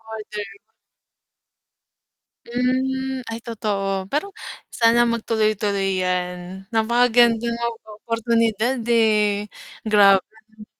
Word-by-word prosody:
Order. 210 Hz, -2 st, -7 dB, 2.0 s
Mm, 260 Hz, +1 st, -1 dB
ay 225 Hz, -, -5 dB
totoo. 210 Hz, -3 st, -2 dB, 0.2 s
Pero 300 Hz, +7 st, -1 dB, 0.5 s
sana 230 Hz, 0 st, +4 dB
magtuloy-tuloy 210 Hz, -4 st, 0 dB
yan, 180 Hz, +1 st, -3 dB
napakagandang 235 Hz, 0 st, +3 dB, 0.5 s
oportunidad 230 Hz, +1 st, 0 dB
eh, 210 Hz, -2 st, +2 dB, 0.4 s
grabe. 215 Hz, +1 st, +2 dB
220 Hz, 65 wpm, -22 LUFS, 205-235 Hz, 2.0 s, sana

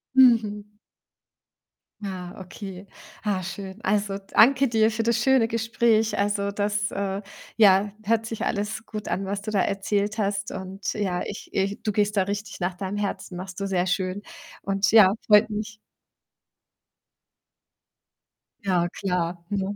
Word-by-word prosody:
Mhm. 215 Hz, -5 st, +4 dB, 1.3 s
Ja, 185 Hz, -3 st, -6 dB
okay. 190 Hz, +1 st, -9 dB, 0.4 s
Ah, 195 Hz, -3 st, -1 dB
schön. 190 Hz, +2 st, -7 dB
Also, 200 Hz, 0 st, 0 dB
danke 275 Hz, +3 st, +5 dB
dir 225 Hz, -2 st, +3 dB
für 225 Hz, +1 st, -2 dB
das 235 Hz, 0 st, +2 dB
schöne 265 Hz, -4 st, +4 dB
Gespräch. 225 Hz, -1 st, +1 dB
Also, 200 Hz, 0 st, 0 dB
das, 210 Hz, +1 st, -1 dB
äh, 195 Hz, 0 st, -3 dB, 0.4 s
ja, 200 Hz, -1 st, +5 dB
hört 225 Hz, +1 st, +1 dB
sich 225 Hz, -1 st, -4 dB
alles 210 Hz, +2 st, -2 dB
gut 215 Hz, -1 st, -6 dB
an, 195 Hz, -, -1 dB
was 200 Hz, +1 st, -3 dB
du 215 Hz, -, -4 dB
da 205 Hz, -, +1 dB
erzählt 200 Hz, +2 st, -1 dB
hast 200 Hz, -1 st, -1 dB
und 190 Hz, +1 st, -5 dB
ja, 190 Hz, -4 st, -1 dB
ich 205 Hz, -, -7 dB
ich 200 Hz, +3 st, -1 dB
du 215 Hz, -, 0 dB
gehst 210 Hz, 0 st, 0 dB
da 195 Hz, -, +4 dB
richtig 205 Hz, +2 st, -5 dB
nach 180 Hz, 0 st, -1 dB
deinem 190 Hz, +2 st, -4 dB
Herzen, 200 Hz, -2 st, -4 dB
machst 185 Hz, 0 st, -7 dB
du 200 Hz, -, -2 dB
sehr 185 Hz, -2 st, +1 dB
schön 185 Hz, +2 st, -1 dB, 0.4 s
und 195 Hz, 0 st, +1 dB
ja, 210 Hz, -4 st, +7 dB
freut 210 Hz, +1 st, +6 dB
mich. 215 Hz, +1 st, -4 dB, 2.8 s
Ja 180 Hz, -3 st, +1 dB
klar, 175 Hz, -2 st, -2 dB
ne? 200 Hz, 0 st, -2 dB
205 Hz, 145 wpm, -25 LUFS, 190-215 Hz, 2.8 s, ja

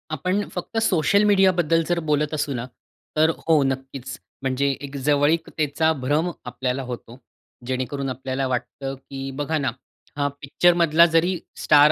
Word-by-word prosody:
आपण 185 Hz, +7 st, 0 dB
फक्त 180 Hz, +5 st, -5 dB
सोशल 195 Hz, +4 st, +3 dB
मीडियाबद्दल 180 Hz, -5 st, +4 dB
जर 175 Hz, -, +2 dB
बोलत 150 Hz, 0 st, +1 dB
असू 145 Hz, -2 st, -1 dB
ना, 120 Hz, -1 st, -3 dB, 0.5 s
तर 155 Hz, +1 st, +5 dB, 0.2 s
हो 160 Hz, -, +5 dB
नक्कीच, 135 Hz, -1 st, -5 dB, 0.3 s
म्हणजे 135 Hz, +1 st, 0 dB, 0.2 s
एक 140 Hz, 0 st, -10 dB
जवळीकतेचा 150 Hz, +1 st, +2 dB
भ्रम 150 Hz, +6 st, +1 dB, 0.2 s
आपल्याला 125 Hz, +2 st, -2 dB
होतो. 120 Hz, -1 st, -7 dB, 0.5 s
जेणेकरून 130 Hz, +1 st, -2 dB
आपल्याला 130 Hz, +1 st, -3 dB
वाटतं 135 Hz, +2 st, -3 dB
की 135 Hz, 0 st, -9 dB, 0.2 s
बघा 155 Hz, +2 st, 0 dB
ना, 130 Hz, -, +1 dB, 0.5 s
हा 145 Hz, 0 st, +1 dB
पिक्चरमधला 170 Hz, +2 st, +4 dB
जरी 170 Hz, +3 st, +4 dB, 0.3 s
स्टार 150 Hz, 0 st, +7 dB
145 Hz, 135 wpm, -23 LUFS, 135-165 Hz, 0.5 s, स्टार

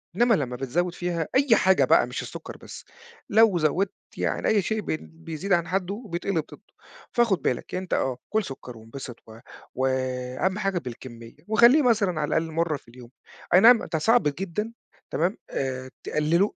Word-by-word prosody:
إنما 240 Hz, +2 st, +4 dB
لمّا 125 Hz, -6 st, -2 dB
بتزوّد 170 Hz, +8 st, -1 dB
فيها، 175 Hz, -3 st, -2 dB
أي 265 Hz, -4 st, +5 dB
حاجة 190 Hz, 0 st, +4 dB
بقى -, -, +4 dB
مش -, -, -4 dB
السكر -, -, -8 dB
بس، -, -, -11 dB, 0.4 s
لو 220 Hz, -3 st, +5 dB
زوّدت 170 Hz, +5 st, +1 dB, 0.2 s
يعني -, -, -1 dB
أي 210 Hz, -2 st, +3 dB
شيء 220 Hz, +3 st, -2 dB
بن 155 Hz, -, -4 dB
بيزيد 165 Hz, +3 st, -4 dB
عن 170 Hz, -1 st, +2 dB
حده 195 Hz, +5 st, -2 dB
بيتقلب 170 Hz, -2 st, -1 dB
ضده، -, -, -14 dB, 0.5 s
فخد 230 Hz, -7 st, +2 dB
بالك 125 Hz, -, -2 dB
أنت 185 Hz, 0 st, -4 dB
آه، 130 Hz, -2 st, 0 dB, 0.2 s
كُل 220 Hz, -1 st, +2 dB
سكر 125 Hz, -5 st, -9 dB
وانبسط 115 Hz, +2 st, -9 dB
و 110 Hz, +1 st, -12 dB, 0.4 s
و 130 Hz, +1 st, 0 dB, 0.6 s
أهم 190 Hz, +2 st, +1 dB
حاجة 195 Hz, -2 st, 0 dB
بالكمية 120 Hz, -3 st, -10 dB
وخليه 235 Hz, +7 st, +6 dB
مثلًا 205 Hz, -, +2 dB
على 145 Hz, -, 0 dB
الأقل 160 Hz, 0 st, -1 dB
مرّة 165 Hz, -2 st, 0 dB
في -, -, -24 dB
اليوم. 120 Hz, 0 st, -13 dB, 0.4 s
أينعم 225 Hz, +5 st, +7 dB
ده 160 Hz, -, +2 dB
صعب 230 Hz, +8 st, +4 dB
جدًا 195 Hz, +9 st, -3 dB, 0.4 s
تمام، 175 Hz, +7 st, 0 dB
آآ، 130 Hz, -1 st, -3 dB, 0.2 s
تقلله 165 Hz, +7 st, +1 dB
175 Hz, 170 wpm, -25 LUFS, 140-200 Hz, 0.6 s, أينعم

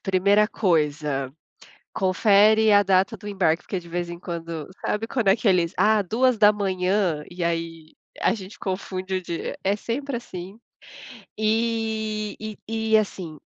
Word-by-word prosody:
Primeira 200 Hz, +2 st, +3 dB
coisa, 150 Hz, -, 0 dB, 0.6 s
confere 210 Hz, +3 st, +4 dB
a 205 Hz, 0 st, +7 dB
data 195 Hz, +3 st, +2 dB
do 205 Hz, -, -10 dB
embarque, 180 Hz, -5 st, +1 dB
porque 190 Hz, -, -4 dB
de 170 Hz, -, -14 dB
vez 175 Hz, 0 st, -3 dB
em 170 Hz, 0 st, -7 dB
quando 165 Hz, -3 st, -6 dB, 0.2 s
sabe 220 Hz, +2 st, -1 dB
quando 230 Hz, -4 st, -1 dB
é 195 Hz, -, +6 dB
que 225 Hz, -1 st, -2 dB
eles: 180 Hz, -2 st, +2 dB
"Ah, 210 Hz, +2 st, +4 dB
2h", 200 Hz, -6 st, +2 dB
e 175 Hz, -1 st, -5 dB
aí 165 Hz, -1 st, -3 dB, 0.3 s
a -, -, +3 dB
gente 200 Hz, -2 st, -9 dB
confunde 190 Hz, 0 st, -4 dB
o 185 Hz, -, -1 dB
dia. 170 Hz, -2 st, -5 dB
É 195 Hz, +1 st, +2 dB
sempre 255 Hz, +6 st, -4 dB
assim. 190 Hz, -4 st, -9 dB, 0.8 s
E 220 Hz, -1 st, -1 dB
e 215 Hz, -1 st, -7 dB, 0.3 s
e 220 Hz, -, +7 dB
assim, 185 Hz, -7 st, -3 dB
195 Hz, 145 wpm, -24 LUFS, 175-215 Hz, 0.8 s, a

